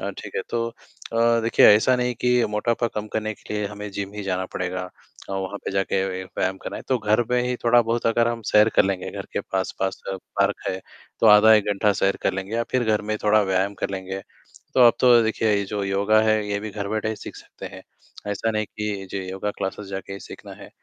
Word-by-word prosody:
अ, - - -3
ठीक - - -10
है, - - +1
तो 115 0 -1 0.5
अ, 115 0 +3
देखिए, 115 +1 +5
ऐसा 110 +5 +6
नहीं 125 0 -1
कि 125 -1 +3
मोटापा 115 +3 0
कम 105 0 -3
करने 110 0 -1
के - - -10
लिए 105 -1 -1
हमें 105 0 -7
जिम 100 0 -5
ही 105 - -5
जाना 95 -1 -2
पड़ेगा 90 0 -3 0.5
अ, - - -5
वहाँ 95 +1 -3
पे - - -2
जाके 95 0 0
व 95 - -3 0.3
व्यायाम 95 +1 0
करना - - -5
है, - - -7
तो 130 - +2
घर 110 +1 +2
पे 125 0 +2
ही 125 - -1
थोड़ा-बहुत 120 0 +3
अगर 115 +1 +3
हम 115 -1 -3
सैर 105 +1 +5
कर - - +6
लेंगे, 95 -2 -2
घर - - -7
के - - -1
पास-पास 95 0 -2
अ, - - -3
पार्क 100 +2 -1
है, 95 - -2 0.4
तो - - +4
आधा 105 +1 +8
1 105 -2 +3
घंटा 100 +1 +2
सैर 95 0 +2
कर - - +1
लेंगे 95 +3 -5
या 115 - +1
फिर 125 -2 +1
घर 110 -1 +1
में 110 - +1
थोड़ा 105 +1 +5
व्यायाम 95 +1 0
कर - - -1
लेंगे। 95 0 -5 0.5
तो - - +3
अब 120 - +7
तो 120 -2 +6
देखिए, 110 0 0
ये 100 0 0
जो 100 +1 -3
योगा 100 +3 +3
है, 110 0 +3
ये 100 0 -1
भी 110 0 -6
घर 100 -1 -5
बैठे 110 0 -1
ही 110 - -3
सीख - - -9
सकते - - -11
हैं, - - -10 0.5
ऐसा 115 +3 -1
नहीं 110 -1 -1
कि 105 -2 -5
जी, 100 - -3
योगा 95 +2 -3
क्लासेज़ 95 +2 -4
जाके 95 0 -6
ही 100 - -7
सीखना - - -11
है। - - -11
105 Hz, 240 wpm, -23 LUFS, 95-115 Hz, 0.5 s, आधा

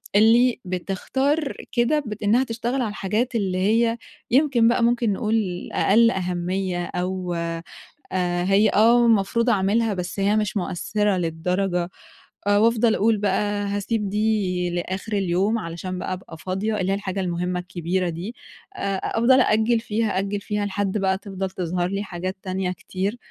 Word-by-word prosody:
اللي 230 +4 +5
بتختار 265 - -1 0.2
كده 240 +5 +2
بت 215 -1 -6
إنها 225 +5 +4
تشتغل 240 +2 -2
على 230 - -1
الحاجات 215 +4 -2
اللي 190 -4 0
هي، 230 +4 +2 0.3
يمكن 260 -3 +4
بقى 235 0 +3
ممكن 235 -2 +2
نقول 210 -3 -1
أقل 230 +3 +4
أهميّة 180 -1 -2
أو 180 0 -3
آآ، 170 0 -3 0.8
هي 195 +3 +4
آه، 235 +4 +5
المفروض 230 +2 +2
أعملها 215 +1 +2
بس 180 +1 -4
هي 200 +2 +2
مش 210 -1 0
مؤثِّرة 200 +2 0
للدرجة، 175 +2 -1 0.6
آآ 205 0 +4
وأفضَل 230 +1 +3
أقول 220 +1 +2
بقى 205 +1 0
هاسيب 205 +1 -1
دي 200 -4 0
لآخر 185 +4 -4
اليوم 195 +3 +1
علشان 180 0 -5
بقى 185 - -3
أبقى 180 -3 -9
فاضية، 195 +6 -2
اللي 185 +1 0
هي - - +2
الحاجة 195 -1 -4
المُهمّة 180 0 -1
الكبيرة 180 0 -2
دي. 175 +8 -6 0.4
آآ 195 - -2
أفضَل 255 +3 +4
أأجِّل 225 0 +3
فيها، 220 -3 -1
أأجِّل 200 +1 -2
فيها 210 0 -2
لحد 205 0 -1
بقى 190 -1 +1
تفضَل 195 -1 -5
تظهر 180 -1 -2
لي 200 +1 -2
حاجات 185 0 -5
تانية 185 -1 -2
كتير 190 +4 -4
200 Hz, 150 wpm, -23 LUFS, 185-225 Hz, 0.8 s, اللي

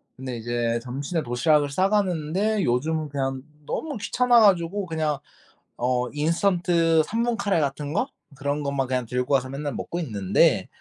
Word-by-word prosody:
근데 130 -2 -6
이제 120 0 -1
점심에 140 +7 -3
도시락을 145 +4 +2
싸가는데 190 +2 +1
요즘은 155 +5 0
그냥 135 -2 -2 0.2
너무 295 - -3
귀찮아 240 +3 +3
가지고 195 -1 +3
그냥 155 -3 -1 0.6
어 125 0 0
인스턴트 165 +1 +2
3 225 +6 -2
분 240 -1 0
카레 200 -6 +1
같은 145 0 -2
거 250 - +1 0.3
그런 145 +2 -2
것만 140 -2 -1
그냥 125 -1 -1
들고 125 +4 0
와서 130 -1 0
맨날 140 +1 -4
먹고 175 - -4
있는데 105 - +2
150 Hz, 320 characters per minute, -24 LUFS, 130-180 Hz, 0.6 s, 귀찮아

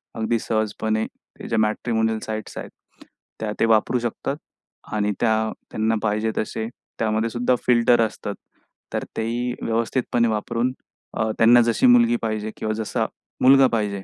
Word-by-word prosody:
अगदी 115 0 0
सहजपणे 110 0 -1
ह्या - - -11
ज्या - - +1
मॅट्रिमोनियल 110 +1 0
साइट्स 110 -1 -5
आहेत, - - -6 0.7
त्या 110 -1 -2
ते - - +4
वापरू 115 +2 +3
शकतात. 120 +4 -3 0.6
आणि 105 -1 +1
त्या 110 -1 +1 0.2
त्यांना 110 +1 +1
पाहिजे 110 +1 0
तसे 110 +1 -2 0.3
त्यामध्ये 110 0 +1
सुद्धा 125 +1 +1
फिल्टर 120 -1 +5
असतात, 110 -2 -2 0.6
तर - - -1
तेही 120 +2 -1
व्यवस्थितपणे 115 +1 0
वापरून 115 +4 -1 0.4
अ, 110 0 +1
त्यांना 120 +2 +7
जशी 115 - +2
मुलगी 240 -1 +6
पाहिजे 110 0 -2
किंवा 110 0 -2
जसा 110 -1 -1 0.4
मुलगा 135 0 +7
पाहिजे, 100 -3 -1
110 Hz, 140 wpm, -23 LUFS, 110-120 Hz, 0.7 s, त्यांना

